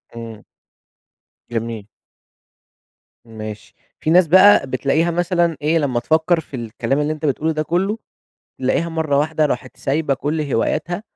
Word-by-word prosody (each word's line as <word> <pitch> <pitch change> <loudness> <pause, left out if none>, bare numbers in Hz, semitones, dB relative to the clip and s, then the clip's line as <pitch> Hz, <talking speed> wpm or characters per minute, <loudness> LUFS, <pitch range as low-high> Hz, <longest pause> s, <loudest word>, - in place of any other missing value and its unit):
امم. 115 -2 -8 1.1
جميل. 115 -2 -4 1.4
ماشي. 110 -2 -9 0.2
في - - -2
ناس 175 +1 +5
بقى 185 -2 +6
بتلاقيها 140 +6 +1
مثلًا 175 -2 +1
إيه؟ 155 +3 +2
لمّا 135 -6 0
تفكّر 160 +6 +2
في 145 -3 -9
الكلام 120 +4 -2
اللي 150 +1 0
أنت 155 0 -6
بتقوله 150 +3 0
ده 155 - -1
كلّه، 190 +7 0 0.6
بتلاقيها 130 +6 0
مرّة 160 -4 0
واحدة 155 +1 +1
راحت 130 -2 -4
سايبة 140 0 0
كل 150 +4 -2
هواياتها، 155 - -1
150 Hz, 135 wpm, -20 LUFS, 130-165 Hz, 1.4 s, بقى